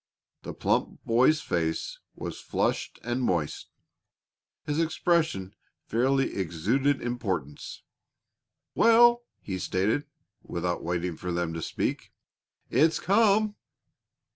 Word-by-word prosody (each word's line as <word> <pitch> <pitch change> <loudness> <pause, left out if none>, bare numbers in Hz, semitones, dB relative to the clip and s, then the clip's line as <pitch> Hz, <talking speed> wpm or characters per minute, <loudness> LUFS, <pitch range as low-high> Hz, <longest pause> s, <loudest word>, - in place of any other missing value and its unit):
The - - -7
plump - - 0
boy's 130 +7 +4
face 80 -2 -2 0.2
was - - -6
flushed - - -1
and 120 +2 -2
moist; 85 - -1 1.0
his 150 +2 -1
expression 160 - +1 0.3
fairly 135 +4 +1
exuded 110 - 0
importance. 95 - -4 0.9
"Well!" 240 +1 +6 0.2
he 95 -2 -4
stated, 105 +12 0 0.3
without 85 0 -3
waiting 85 0 -2
for 90 - -4
them 85 -1 -1
to 80 - -4
speak. - - -3 0.6
"It's 155 +6 +3
come." 210 +1 +3
120 Hz, 100 wpm, -27 LUFS, -, 1.0 s, Well